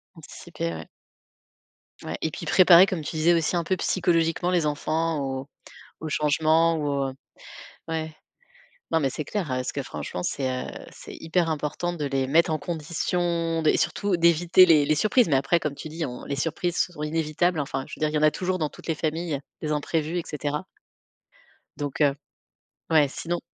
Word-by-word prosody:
Anticiper, 85 Hz, 0 st, -6 dB
ouais. 80 Hz, -1 st, -8 dB, 1.2 s
Ouais. -, -, -4 dB
Et 160 Hz, -, 0 dB
puis -, -, -7 dB
préparer, 185 Hz, 0 st, +7 dB
comme 185 Hz, -4 st, -3 dB
tu 150 Hz, -, -6 dB
disais 160 Hz, +2 st, +4 dB
aussi 165 Hz, +1 st, +1 dB
un 170 Hz, -, +1 dB
peu 185 Hz, +3 st, 0 dB
psychologiquement 170 Hz, -1 st, +1 dB
les 175 Hz, -3 st, +2 dB
enfants 155 Hz, +1 st, -1 dB
aux 135 Hz, 0 st, -4 dB, 0.5 s
aux 160 Hz, -, -4 dB
changements 160 Hz, +3 st, +2 dB
ou 150 Hz, -, -2 dB, 0.2 s
au -, -, -9 dB, 0.8 s
Ouais. 160 Hz, -1 st, -3 dB, 0.8 s
Non, 160 Hz, -, +3 dB
mais 135 Hz, -3 st, +1 dB
c'est 150 Hz, -, -4 dB
clair, 205 Hz, -5 st, -2 dB
heu, -, -, -10 dB
parce 130 Hz, 0 st, -2 dB
que 140 Hz, -, -4 dB
franchement, 75 Hz, +2 st, -6 dB
c'est, 135 Hz, -2 st, -1 dB, 0.2 s
heu -, -, -7 dB, 0.2 s
c'est -, -, -11 dB
hyper 165 Hz, 0 st, 0 dB
important 155 Hz, +3 st, -2 dB
de 150 Hz, -4 st, -3 dB
les 135 Hz, -1 st, 0 dB
mettre 160 Hz, +4 st, +3 dB
en 155 Hz, -, +1 dB
condition 170 Hz, 0 st, -1 dB
de 155 Hz, -, +3 dB
et -, -, +3 dB
surtout 205 Hz, -2 st, 0 dB
d'éviter 170 Hz, +2 st, +5 dB
les 155 Hz, -4 st, +5 dB
les 155 Hz, -, +2 dB
surprises. 215 Hz, -, +3 dB
Mais 145 Hz, -, +2 dB
après, 140 Hz, +6 st, +2 dB
comme 150 Hz, -2 st, -3 dB
tu 155 Hz, -, -8 dB
dis 160 Hz, +1 st, -3 dB
on: 125 Hz, -2 st, -7 dB
«Les 140 Hz, -, -3 dB
surprises 170 Hz, +3 st, -2 dB
sont 165 Hz, -4 st, -1 dB
inévitables». 160 Hz, +2 st, 0 dB
Enfin, 135 Hz, -1 st, -3 dB
je -, -, -12 dB
veux -, -, -15 dB
dire, 155 Hz, 0 st, +1 dB
il 155 Hz, -, -4 dB
y -, -, +4 dB
en 150 Hz, -, 0 dB
a 155 Hz, -, +3 dB
toujours 185 Hz, 0 st, -2 dB
dans 155 Hz, -2 st, 0 dB
toutes -, -, -14 dB
les 165 Hz, -, 0 dB
familles 160 Hz, -1 st, -2 dB, 0.2 s
des 155 Hz, -1 st, -2 dB
imprévus, 155 Hz, +2 st, -1 dB
et 170 Hz, -, -2 dB
cetera. 150 Hz, +1 st, -3 dB, 1.1 s
Donc, 145 Hz, 0 st, -4 dB
heu 140 Hz, -2 st, +4 dB, 0.8 s
ouais, 150 Hz, -3 st, +5 dB
sinon 170 Hz, +5 st, -4 dB
160 Hz, 195 wpm, -25 LUFS, 150-170 Hz, 1.2 s, préparer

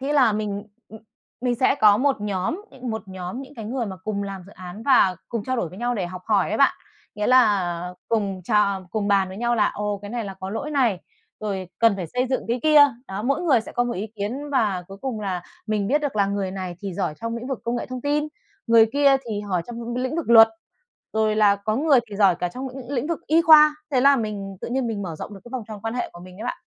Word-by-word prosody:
Thế 275 Hz, +2 st, -1 dB
là 260 Hz, -7 st, +4 dB
mình 205 Hz, -1 st, -3 dB, 0.3 s
ừm, 220 Hz, 0 st, -12 dB, 0.4 s
mình 245 Hz, -1 st, 0 dB
sẽ 255 Hz, +3 st, +3 dB
có 210 Hz, -6 st, +5 dB
một 270 Hz, -3 st, +1 dB
nhóm, 205 Hz, -, -2 dB
ừm, 255 Hz, -2 st, -6 dB
một 220 Hz, 0 st, -4 dB
nhóm 185 Hz, +5 st, -6 dB
những 275 Hz, +2 st, -13 dB
cái 225 Hz, -4 st, -7 dB
người 240 Hz, +1 st, -2 dB
mà 190 Hz, -2 st, -6 dB
cùng 200 Hz, +2 st, -4 dB
làm 195 Hz, -2 st, -6 dB
dự 200 Hz, -, -14 dB
án 185 Hz, +3 st, -9 dB
và 230 Hz, -9 st, +4 dB
cùng 230 Hz, -4 st, -3 dB
trao 255 Hz, +1 st, -1 dB
đổi 180 Hz, -, -1 dB
với 185 Hz, +5 st, -12 dB
nhau 245 Hz, +1 st, -1 dB
để 190 Hz, -6 st, -2 dB
học 185 Hz, 0 st, -8 dB
hỏi -, -, +2 dB
ấy -, -, -2 dB
bạn. -, -, +5 dB, 0.4 s
Nghĩa 210 Hz, 0 st, -2 dB
là 185 Hz, -8 st, +3 dB
cùng 200 Hz, -4 st, -1 dB
tr 220 Hz, -, -4 dB, 0.4 s
cùng 210 Hz, -1 st, -1 dB
bàn 195 Hz, -2 st, +3 dB
với 190 Hz, -, -8 dB
nhau 240 Hz, +2 st, 0 dB
là, 210 Hz, -, +3 dB
ồ, 205 Hz, -1 st, -2 dB
cái 205 Hz, -, -7 dB
này 235 Hz, -2 st, -3 dB
là 195 Hz, -1 st, -6 dB
có 190 Hz, +1 st, -5 dB
lỗi 250 Hz, +8 st, -4 dB
này, 245 Hz, -10 st, +1 dB, 0.4 s
rồi 195 Hz, -4 st, -3 dB
cần 230 Hz, -3 st, +4 dB
phải 180 Hz, -4 st, -4 dB
xây 250 Hz, +9 st, -1 dB
dựng 260 Hz, -, 0 dB
cái 240 Hz, +1 st, 0 dB
kia. 305 Hz, -1 st, +6 dB, 0.3 s
Đó, 195 Hz, +2 st, -4 dB
mỗi 275 Hz, +7 st, 0 dB
người 270 Hz, -9 st, +4 dB
sẽ -, -, -10 dB
có 245 Hz, -, +1 dB
một 240 Hz, -, -2 dB
ý 205 Hz, +2 st, -4 dB
kiến, 255 Hz, +9 st, -4 dB
và 210 Hz, -9 st, +1 dB
cuối 195 Hz, -, -9 dB
cùng 255 Hz, -5 st, -3 dB
là 185 Hz, -3 st, -3 dB, 0.2 s
mình 210 Hz, -2 st, 0 dB
biết 285 Hz, +8 st, +2 dB
được 285 Hz, -7 st, -3 dB
là 200 Hz, -, +3 dB
người 200 Hz, -1 st, -2 dB
này 185 Hz, -2 st, -5 dB
thì 195 Hz, -3 st, -4 dB
giỏi 180 Hz, -5 st, -2 dB
trong 230 Hz, 0 st, -3 dB
lĩnh 235 Hz, +2 st, -6 dB
vực 265 Hz, -, -2 dB
công 235 Hz, +1 st, -1 dB
nghệ -, -, -4 dB
thông 255 Hz, -1 st, -6 dB
tin, 290 Hz, +2 st, 0 dB, 0.4 s
người 230 Hz, -1 st, +6 dB
kia 280 Hz, -1 st, +5 dB
thì 210 Hz, -2 st, -2 dB
hỏi 190 Hz, -4 st, -2 dB
trong 240 Hz, -1 st, -7 dB
những 235 Hz, 0 st, -5 dB
cái 250 Hz, +1 st, -1 dB
lĩnh 260 Hz, +5 st, -2 dB
vực 330 Hz, -8 st, -2 dB
luật, 225 Hz, -1 st, +9 dB, 0.6 s
rồi 220 Hz, -1 st, +1 dB
là 205 Hz, -2 st, +5 dB
có 215 Hz, +2 st, -2 dB
người 285 Hz, -1 st, +4 dB
thì 200 Hz, -, -6 dB
giỏi 195 Hz, -4 st, +4 dB
cả 180 Hz, +1 st, -2 dB
trong 260 Hz, +8 st, -6 dB
l 260 Hz, 0 st, -9 dB
lĩnh 255 Hz, +3 st, -1 dB
vực 335 Hz, -1 st, -2 dB
y 325 Hz, +2 st, +4 dB
khoa. 305 Hz, -2 st, +8 dB, 0.2 s
Thế 260 Hz, -3 st, +2 dB
là 275 Hz, +1 st, +6 dB
mình 205 Hz, -4 st, -4 dB
tự -, -, -5 dB
nhiên 255 Hz, +1 st, -1 dB
mình 215 Hz, -3 st, -3 dB
mở 170 Hz, -3 st, -5 dB
rộng 210 Hz, -, -7 dB
được 195 Hz, -, -11 dB
cái 240 Hz, -, -11 dB
vòng 255 Hz, -, -3 dB
tròn 215 Hz, -2 st, -8 dB
quan 225 Hz, +1 st, -3 dB
hệ 245 Hz, -, -3 dB
của 175 Hz, -, -12 dB
mình 185 Hz, 0 st, -12 dB
đấy 220 Hz, -, -6 dB
bạn. 245 Hz, -, -4 dB
220 Hz, 275 wpm, -23 LUFS, 195-255 Hz, 0.6 s, luật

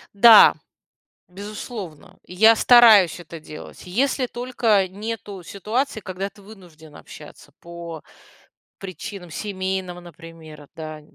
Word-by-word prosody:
Да, 225 Hz, +1 st, +8 dB, 0.7 s
безусловно, 200 Hz, -, -9 dB
я 220 Hz, +5 st, +4 dB
стараюсь 220 Hz, -9 st, +6 dB
это 165 Hz, 0 st, -11 dB
делать, 155 Hz, -1 st, -12 dB
если 255 Hz, +7 st, -1 dB
только 235 Hz, -6 st, 0 dB
нету 205 Hz, -1 st, -7 dB
ситуации, 220 Hz, +7 st, -4 dB
когда 190 Hz, +1 st, -6 dB
ты 205 Hz, -, -21 dB
вынужден 175 Hz, -7 st, -16 dB
общаться -, -, -14 dB
по 170 Hz, -2 st, -10 dB, 0.8 s
причинам 190 Hz, -1 st, -9 dB
семейным, 190 Hz, -1 st, -5 dB
например, 165 Hz, -3 st, -14 dB
да. 155 Hz, -1 st, -8 dB
190 Hz, 100 wpm, -21 LUFS, 170-215 Hz, 0.8 s, Да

